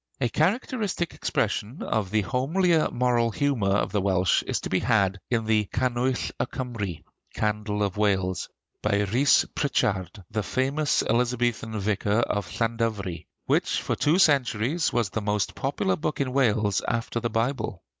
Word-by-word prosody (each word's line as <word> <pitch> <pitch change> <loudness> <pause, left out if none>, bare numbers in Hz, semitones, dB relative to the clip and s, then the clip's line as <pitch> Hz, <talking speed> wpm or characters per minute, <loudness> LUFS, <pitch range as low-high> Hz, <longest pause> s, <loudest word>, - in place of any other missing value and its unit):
A 120 -3 +1
characteristic 195 - 0
expression 115 +9 -2
of 105 -4 -1
the 110 +2 +2
homelier 155 - +1
moral 120 -2 +1
humor 120 -4 0
of 100 +1 +1
the 105 - +1
Welsh 95 -2 +2
is - - 0
to - - -4
be 95 - +2
had 100 -5 +2
in 115 -2 0
the 110 -1 +2
'Canwyll 125 +3 -1
y - - +1
Cymry' 115 - -4 0.3
(Candle 105 -1 -1
of 100 0 -2
Wales), 95 -3 0 0.3
by 105 -1 +1
Rhys 125 +8 +4
Pritchard, 100 - -1
the 110 0 -1
famous 135 +7 0
Elizabethan 120 -2 0
vicar 105 +2 +1
of 105 -4 -1
Llandovery, 115 -6 -2 0.2
which - - +1
for - - -2
two 155 +4 +2
centuries 140 - +2
was 120 -5 0
the 110 - -2
most 105 -1 -1
popular 145 +8 -1
book 155 0 -3
in 130 -2 -1
Wales 110 -7 +2
after 120 0 -1
the 120 - -2
Bible. 115 -5 -2
115 Hz, 155 wpm, -26 LUFS, 105-130 Hz, 0.3 s, Rhys